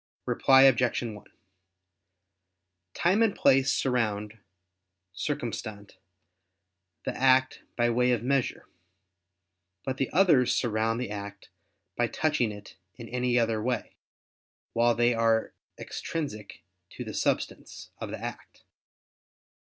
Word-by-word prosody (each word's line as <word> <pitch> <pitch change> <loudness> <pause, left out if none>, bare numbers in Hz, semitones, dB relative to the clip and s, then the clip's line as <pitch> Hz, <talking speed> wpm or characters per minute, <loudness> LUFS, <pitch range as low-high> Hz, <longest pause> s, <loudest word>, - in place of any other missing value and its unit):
Reply 135 0 +5
Obj. 125 -2 +4
1: 105 -3 -7 1.7
Time 185 +6 +2
and 225 -3 +3
place 135 0 +4
surround 110 -4 -1 0.7
(circumstant) 100 +3 -5 1.1
the - - -3
act 130 0 +3
by 120 0 +2
way 125 +1 +2
of 120 -2 0
measure; 135 0 -1 1.2
but 130 -1 -3
the 135 - -1
others 160 -8 +4
surround 115 -1 0
the 125 -4 -4
act 100 -1 -8 0.5
by - - +1
touching 150 -8 0
it 105 0 -12 0.2
in 115 -2 -10
any 125 0 0
other 115 -2 +1
way, 125 +2 -3 0.8
while 120 0 +3
they 120 +1 +3
are 115 -1 +1 0.2
extrinsic 105 - -6 0.3
to - - -7
the - - -7
substance - - -3
of - - -5
the - - -5
act. - - -8
120 Hz, 115 wpm, -28 LUFS, 110-130 Hz, 1.7 s, Reply